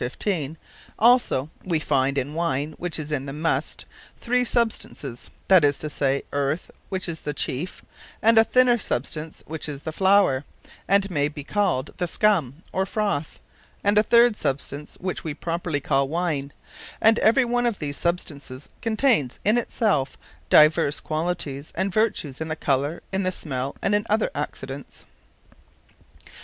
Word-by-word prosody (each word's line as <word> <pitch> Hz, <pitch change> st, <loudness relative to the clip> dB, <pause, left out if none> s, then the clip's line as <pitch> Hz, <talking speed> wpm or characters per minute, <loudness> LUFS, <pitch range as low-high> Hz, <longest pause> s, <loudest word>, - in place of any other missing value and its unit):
15._ 155 Hz, -, -2 dB, 0.4 s
Also 225 Hz, -, +3 dB
we 175 Hz, -3 st, 0 dB
finde 140 Hz, -2 st, +1 dB
in 135 Hz, +2 st, -2 dB
Wine 155 Hz, -3 st, -1 dB
which 175 Hz, -3 st, -1 dB
is 155 Hz, -1 st, -5 dB
in 140 Hz, -2 st, -2 dB
the -, -, -4 dB
Must, 160 Hz, +3 st, -1 dB, 0.3 s
three 250 Hz, +1 st, +2 dB
substances, 220 Hz, -, -2 dB, 0.2 s
that 185 Hz, -4 st, +6 dB
is 145 Hz, -1 st, +3 dB
to 155 Hz, -, -4 dB
say, 140 Hz, -1 st, 0 dB
earth, 145 Hz, +3 st, -1 dB, 0.2 s
which 190 Hz, 0 st, -2 dB
is 165 Hz, -2 st, -4 dB
the 150 Hz, -1 st, -5 dB
chiefe; 150 Hz, +6 st, -4 dB, 0.4 s
and 225 Hz, +1 st, +6 dB
a -, -, +8 dB
thinner 245 Hz, +1 st, +4 dB
substance, 155 Hz, -, -4 dB
which 160 Hz, 0 st, -4 dB
is 145 Hz, -1 st, -7 dB
the 160 Hz, -, -3 dB
flower, 190 Hz, -6 st, +3 dB, 0.4 s
and 195 Hz, 0 st, +3 dB
may 145 Hz, -3 st, +1 dB
be 145 Hz, -1 st, -8 dB
called 155 Hz, -7 st, 0 dB
the 180 Hz, -, -1 dB
scum, 170 Hz, -, +1 dB
or 190 Hz, -, +1 dB
froath: 200 Hz, -7 st, -2 dB, 0.5 s
and 205 Hz, +1 st, +3 dB
a -, -, +7 dB
third 235 Hz, +1 st, +5 dB
substance 145 Hz, -2 st, -3 dB
which 185 Hz, 0 st, -4 dB
we 155 Hz, -3 st, -4 dB
properly 165 Hz, -2 st, -2 dB
call 135 Hz, -1 st, +1 dB
Wine; 155 Hz, -3 st, -2 dB, 0.5 s
And 225 Hz, +1 st, +5 dB
every 245 Hz, +4 st, +4 dB
one 245 Hz, 0 st, +1 dB
of 230 Hz, -4 st, -1 dB
these 145 Hz, -2 st, -4 dB
substances, 145 Hz, -6 st, -3 dB
containes 220 Hz, -, +1 dB
in 210 Hz, +3 st, +4 dB
it 240 Hz, -, 0 dB
selfe 150 Hz, -, +1 dB, 0.3 s
divers 150 Hz, -1 st, +5 dB
qualities, 155 Hz, -3 st, -3 dB
and 190 Hz, +2 st, -1 dB
vertues; 180 Hz, -, 0 dB
in 160 Hz, -, -2 dB
the 155 Hz, -, -2 dB
colour, 145 Hz, +2 st, -1 dB
in 190 Hz, 0 st, 0 dB
the 185 Hz, -1 st, 0 dB
smell, 135 Hz, -6 st, -4 dB
and 200 Hz, -, +2 dB
in 205 Hz, +2 st, +1 dB
other 215 Hz, +1 st, +1 dB
Accidents. 140 Hz, -1 st, -6 dB
160 Hz, 160 wpm, -24 LUFS, 145-205 Hz, 0.5 s, a